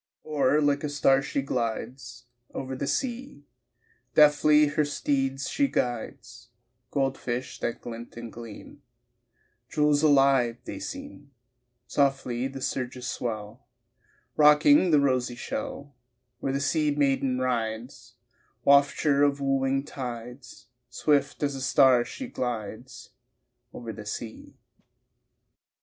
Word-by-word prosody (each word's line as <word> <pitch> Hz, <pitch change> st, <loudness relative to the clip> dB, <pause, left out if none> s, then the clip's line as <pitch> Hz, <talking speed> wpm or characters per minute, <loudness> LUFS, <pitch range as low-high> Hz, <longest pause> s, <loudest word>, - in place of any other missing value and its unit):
Or 150 Hz, -1 st, +2 dB
like 145 Hz, 0 st, +1 dB
a 150 Hz, -, -1 dB
star 135 Hz, -1 st, +3 dB
she 140 Hz, -1 st, -2 dB
glides 125 Hz, 0 st, -4 dB, 0.3 s
Over 130 Hz, 0 st, -4 dB
the 140 Hz, -, -3 dB
sea, 245 Hz, -, -3 dB, 0.7 s
Deftly 150 Hz, 0 st, +6 dB
her 150 Hz, +1 st, +1 dB
steeds 135 Hz, -2 st, -1 dB
she 280 Hz, -, +1 dB
guides 120 Hz, -, -4 dB, 0.4 s
Gold 135 Hz, -2 st, -1 dB
fish 125 Hz, +1 st, -4 dB
that 120 Hz, -, -3 dB
glint 120 Hz, 0 st, -9 dB
and 120 Hz, -1 st, -8 dB
gleam, 115 Hz, +4 st, -11 dB, 0.9 s
Jewels 150 Hz, -1 st, +2 dB
alive 135 Hz, -5 st, +4 dB
they -, -, -6 dB
seem 275 Hz, -, -8 dB, 0.6 s
Softly 135 Hz, -3 st, 0 dB
the 135 Hz, 0 st, -8 dB
surges 125 Hz, -1 st, -3 dB
swell, 110 Hz, 0 st, -5 dB, 0.7 s
Rocking 155 Hz, -, +6 dB
the 150 Hz, -3 st, +5 dB
rosy 130 Hz, -3 st, +1 dB
shell 205 Hz, -, -6 dB, 0.5 s
Where 135 Hz, -, -2 dB
the 135 Hz, -, -1 dB
sea 150 Hz, +1 st, +1 dB
maiden 135 Hz, -3 st, +1 dB
rides, 120 Hz, -1 st, -3 dB, 0.5 s
Wafture 140 Hz, 0 st, +4 dB
of 145 Hz, -1 st, +3 dB
wooing 135 Hz, 0 st, 0 dB
tides, 125 Hz, -2 st, -8 dB, 0.2 s
Swift 145 Hz, +3 st, 0 dB
as 145 Hz, -1 st, 0 dB
a 135 Hz, -, -6 dB
star 130 Hz, -3 st, +5 dB
she 265 Hz, -, -7 dB
glides 120 Hz, -, -6 dB, 0.6 s
Over 115 Hz, -2 st, -7 dB
the 105 Hz, -1 st, -10 dB
sea. 110 Hz, +1 st, -7 dB
135 Hz, 115 wpm, -27 LUFS, 125-145 Hz, 0.9 s, Deftly